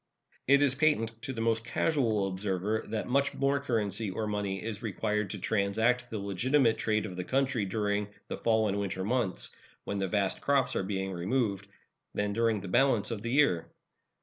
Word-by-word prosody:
It 140 Hz, +2 st, +6 dB
is 140 Hz, -3 st, +4 dB
patent 140 Hz, -6 st, +2 dB
to 135 Hz, -, -4 dB
the 115 Hz, -3 st, -4 dB
most 115 Hz, 0 st, +1 dB
casual 115 Hz, -6 st, +1 dB
observer 95 Hz, +2 st, -1 dB
that 110 Hz, 0 st, -3 dB
much 140 Hz, +2 st, +1 dB
more 140 Hz, +1 st, +2 dB
currency, 110 Hz, -5 st, 0 dB
or 110 Hz, +3 st, -3 dB
money, 105 Hz, -2 st, -2 dB
is 110 Hz, -2 st, -4 dB
required 105 Hz, -1 st, -1 dB
to 105 Hz, -, -4 dB
transact 110 Hz, +5 st, +1 dB
the 110 Hz, -, -4 dB
legitimate 115 Hz, +4 st, +2 dB
trade 110 Hz, -1 st, +1 dB
of 95 Hz, -4 st, -6 dB
the 90 Hz, -, -3 dB
country 130 Hz, -2 st, 0 dB
during 105 Hz, +1 st, -1 dB, 0.2 s
the -, -, -5 dB
fall 110 Hz, -1 st, +2 dB
and 100 Hz, 0 st, -1 dB
winter 95 Hz, -2 st, -2 dB
months, 110 Hz, -3 st, -1 dB, 0.3 s
when 100 Hz, -, -3 dB
the 95 Hz, -, 0 dB
vast 100 Hz, 0 st, 0 dB
crops 140 Hz, -2 st, +2 dB
are -, -, +1 dB
being 95 Hz, 0 st, -2 dB
removed, 100 Hz, +1 st, -1 dB, 0.5 s
than 105 Hz, 0 st, 0 dB
during 115 Hz, -2 st, +1 dB
the 95 Hz, -, -7 dB
balance 120 Hz, +2 st, +3 dB
of 110 Hz, -3 st, -3 dB
the 115 Hz, -, -3 dB
year. 125 Hz, -, +3 dB
110 Hz, 185 wpm, -30 LUFS, 100-125 Hz, 0.5 s, It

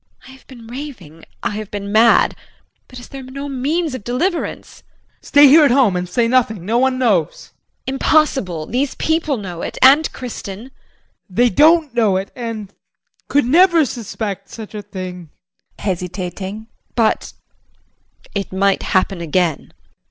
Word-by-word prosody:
JULIE. -, -, -16 dB
I -, -, -12 dB
have -, -, -27 dB
been 240 Hz, -4 st, -13 dB
raving, 235 Hz, -, -9 dB, 0.2 s
I -, -, 0 dB
have 215 Hz, -2 st, -6 dB
been 200 Hz, -1 st, -5 dB
mad, 225 Hz, +2 st, +4 dB, 0.5 s
but 255 Hz, -, -12 dB
is 245 Hz, -, -10 dB
there 275 Hz, -, -8 dB
no 270 Hz, +2 st, -7 dB
means 285 Hz, +4 st, -1 dB
of 255 Hz, -, -6 dB
deliverance? 330 Hz, -, -3 dB
JEAN. -, -, -40 dB
Stay 290 Hz, 0 st, +6 dB
here 305 Hz, +3 st, +7 dB
at 290 Hz, -, +5 dB
home 245 Hz, -6 st, +3 dB
and 180 Hz, 0 st, -3 dB
say 230 Hz, +5 st, +1 dB
nothing. 225 Hz, -7 st, +1 dB
No 230 Hz, +4 st, +1 dB
one 260 Hz, 0 st, +2 dB
knows. 210 Hz, -11 st, 0 dB
JULIE. -, -, -48 dB
Impossible. 265 Hz, -, +1 dB
These 260 Hz, -, -2 dB
people 315 Hz, -3 st, 0 dB
know 180 Hz, -5 st, -7 dB
it, -, -, -5 dB
and 280 Hz, +4 st, +6 dB
Kristin. 225 Hz, -6 st, -7 dB
JEAN. 245 Hz, +6 st, -12 dB, 0.6 s
They 240 Hz, +6 st, +3 dB
don't 310 Hz, -, +4 dB
know 220 Hz, -6 st, +2 dB
it 190 Hz, +1 st, -5 dB
and 225 Hz, -5 st, -6 dB, 0.5 s
could 285 Hz, -1 st, +2 dB
never 335 Hz, +3 st, +5 dB
suspect 210 Hz, -4 st, -5 dB
such 220 Hz, -2 st, -9 dB
a 210 Hz, -, -5 dB
thing. 185 Hz, -4 st, -8 dB, 0.5 s
JULIE -, -, -11 dB
[Hesitating]. 185 Hz, +3 st, -4 dB, 0.3 s
But 225 Hz, -2 st, 0 dB, 1.0 s
it 200 Hz, -1 st, -3 dB
might 195 Hz, +1 st, +1 dB
happen 185 Hz, -1 st, 0 dB
again. 170 Hz, -1 st, 0 dB
JEAN. -, -, -37 dB
230 Hz, 165 wpm, -18 LUFS, 195-270 Hz, 1.0 s, here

